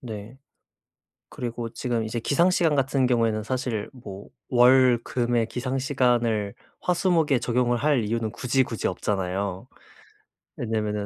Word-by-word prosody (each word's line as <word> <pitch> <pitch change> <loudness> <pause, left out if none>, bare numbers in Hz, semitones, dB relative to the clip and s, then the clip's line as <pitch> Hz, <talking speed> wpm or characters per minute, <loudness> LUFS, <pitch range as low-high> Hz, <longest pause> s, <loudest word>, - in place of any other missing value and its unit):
네. 115 +1 -8 0.9
그리고 120 -1 -5
지금 120 -3 -2
이제 110 +2 -3
기상시간 165 +4 +2
같은 135 -1 +1
경우에는 115 -3 +1
사실 125 -3 -3
뭐 100 -6 -10 0.2
월, 125 0 +6
금의 120 -2 0
기상시간을 125 -4 0 0.2
화, 180 - +1
수, 185 +1 +1
목에 155 -5 +3
적용을 120 0 +1
할 140 -2 +2
이유는 110 0 -2
굳이, 130 +3 +1
굳이 115 -3 -3
없잖아요. 95 -1 -2 0.9
왜냐하면은 105 -2 -2
120 Hz, 290 characters per minute, -25 LUFS, 110-130 Hz, 0.9 s, 월